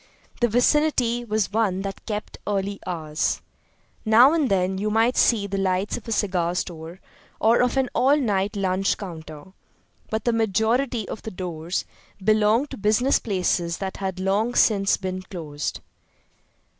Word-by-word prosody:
The 240 - +3
vicinity 245 0 +2
was 215 -3 -1
one 200 -4 +1
that 195 -1 -7
kept 210 -1 -5
early 200 -1 -1
hours. 155 -3 -1 0.6
Now 240 +6 +6
and 305 -6 +1
then 190 0 +1
you 210 +2 -1
might 225 +3 +2
see 220 -4 +3
the 195 0 -3
lights 190 +1 0
of 240 - -9
a - - -4
cigar 180 -5 0
store 170 0 -5 0.4
or 230 +3 +4
of 250 +1 +1
an 265 -1 +2
all 275 +3 +4
night 205 -7 0
lunch 195 0 0
counter; 160 -2 -9 0.6
but 220 0 -2
the 240 - +2
majority 225 +2 +1
of - - -6
the - - -6
doors 175 -2 -4 0.3
belonged 215 +6 +2
to - - -6
business 215 +6 +2
places 180 -4 -1
that 190 -1 -5
had 190 -1 -4
long 205 +5 0
since 195 -3 +3
been 185 -1 -4
closed. 155 -6 -5
200 Hz, 155 wpm, -24 LUFS, 185-230 Hz, 0.6 s, Now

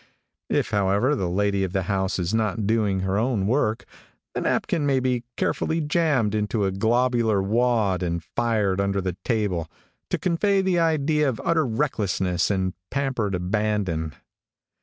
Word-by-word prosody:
If, - - 0
however, 100 +7 +2
the 95 -9 -1
lady 100 +1 +1
of 95 -1 -3
the 95 -2 0
house 95 0 -1
is 90 +2 -2
not 110 -1 0
doing 105 -3 +1
her 95 +2 0
own 115 -4 0
work, 110 -1 0 0.5
the - - -2
napkin 165 - 0
may 135 -1 +3
be 125 -2 0
carefully 160 - 0
jammed 150 - +1
into 105 0 0
a 95 - 0
globular 115 +1 +2
wad, 105 -2 +1
and 85 -2 -2
fired 105 -4 0
under 100 0 0
the 90 -1 -3
table, 100 -9 -1 0.4
to - - 0
convey 195 +3 +1
the 185 -2 +2
idea 155 -2 +2
of 120 - -4
utter 160 -4 +2
recklessness 100 - 0
and 95 -2 0 0.2
pampered 130 -8 -1
abandon. 90 -4 -1
105 Hz, 155 wpm, -24 LUFS, 95-130 Hz, 0.5 s, may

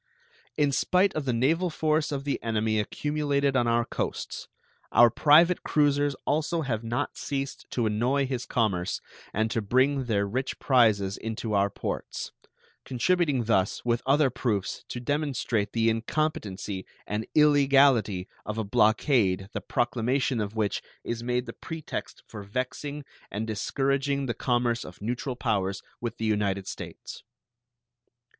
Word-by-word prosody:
In 145 -2 +3
spite 185 +9 +2
of 155 -2 -3
the 130 - +1
naval 155 +10 +2
force 155 -1 0
of 140 -1 -3
the 140 - -2
enemy 110 -1 0
accumulated 140 +4 0
on 120 -2 +3
our 115 0 +2
coasts, - - -4 0.4
our 120 -1 +7
private 165 +7 +5
cruisers 145 -1 +2
also 160 +3 0
have 120 -6 -2
not 115 +1 -2
ceased 140 -1 -4
to 120 - -1
annoy 120 +6 +1
his 130 -2 -4
commerce 95 -6 0 0.3
and 110 +2 0
to 115 - 0
bring 130 +5 +2
their 100 -4 +1
rich 130 +6 -2
prizes 110 -7 +3
into 110 0 -4
our 100 0 +3
ports, - - -5 0.5
contributing 145 0 +1
thus, 105 -3 +1
with 120 0 +1
other 140 -1 +4
proofs, 110 -5 -2
to 120 - -5
demonstrate 130 -6 -1
the 115 -1 +1
incompetency 110 -5 -1 0.2
and 105 +2 -3
illegality 140 -10 +4 0.2
of 105 +1 -5
a 110 - 0
blockade 105 -2 +2
the - - -3
proclamation 120 +1 0
of 105 +1 -4
which 105 -2 0 0.2
is 115 -1 -3
made 125 +1 -1
the 115 - -7
pretext 160 -2 -6
for 105 - -9
vexing 130 +7 -4 0.2
and 105 +2 -3
discouraging 135 +5 0
the 120 - -1
commerce 120 0 0
of 90 - -11
neutral 125 +4 -3
powers 95 -5 -1 0.2
with 120 -1 -4
the 115 - -3
United 100 -3 0
States. - - -8
120 Hz, 145 wpm, -27 LUFS, 110-140 Hz, 0.5 s, our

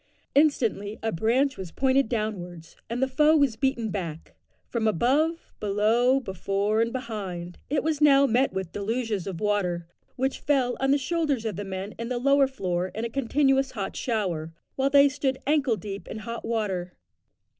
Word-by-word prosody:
Instantly 230 -8 +2
a 225 - 0
branch 250 +9 +1
was 185 -3 -7
pointed 265 +1 +2
downwards, 180 -8 -4
and 240 +3 -1
the - - +2
foe 300 +4 +4
was 280 -6 +2
beaten 235 -3 -1
back; 165 -6 -5 0.3
from 230 -2 -1
above, 285 - +1
below, 220 +6 +3
before, 200 0 -1
and 230 0 +1
behind, 195 -8 -5
it 285 +1 0
was 310 -1 -1
now 280 -2 +6
met 260 +2 +2
with 190 -2 -4
deluges 215 -2 -2
of 185 -4 -4
water, 185 -5 0 0.3
which 265 +1 -1
fell 260 -4 +1
on 270 - +1
the 280 - +5
shoulders 285 -4 -1
of 215 -4 -2
the 205 - -4
men 195 +1 -5
in 230 +1 -4
the 250 - -1
lower 275 +2 +4
floor 185 -8 -2
in 220 +2 -2
a - - -3
continuous 270 +1 +2
hot 200 -5 -4
shower, 180 -9 -2 0.2
while 270 +1 +1
they 280 0 +7
stood 270 -1 -1
ankle 280 -5 +2
deep 195 +1 -7
in - - -6
hot 230 +2 -6
water. 195 -6 -2
230 Hz, 175 wpm, -26 LUFS, 200-270 Hz, 0.3 s, they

